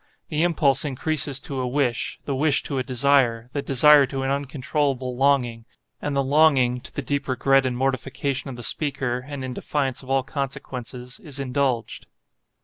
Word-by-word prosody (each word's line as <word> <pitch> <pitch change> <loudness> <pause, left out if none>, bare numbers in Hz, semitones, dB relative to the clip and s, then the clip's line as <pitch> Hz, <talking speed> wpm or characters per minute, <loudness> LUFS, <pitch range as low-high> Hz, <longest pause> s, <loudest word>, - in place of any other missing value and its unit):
The 155 -1 0
impulse 150 -6 +2
increases 145 0 -1
to 140 -3 -5
a 125 - -1
wish, 125 -2 -1
the 140 - -2
wish 145 +1 +2
to 140 -3 -2
a - - 0
desire, 125 -3 +2
the 145 - -1
desire 140 +1 +6
to 135 +1 -4
an 135 - 0
uncontrollable 140 -2 -1
longing, 125 -4 +1 0.3
and 145 -1 -2
the 140 - +2
longing 135 -3 +4
(to - - -8
the 145 - -3
deep 140 +2 -2
regret 135 +1 +3
and 125 -1 -2
mortification 135 +1 -2
of 130 - -6
the 120 - -8
speaker, 135 -4 -1
and 140 -2 -6
in 130 - -5
defiance 135 -1 -2
of 130 - -14
all 135 0 +2
consequences) 125 - -6
is 150 -9 -8
indulged. 130 -3 -1
135 Hz, 175 wpm, -24 LUFS, 125-140 Hz, 0.3 s, desire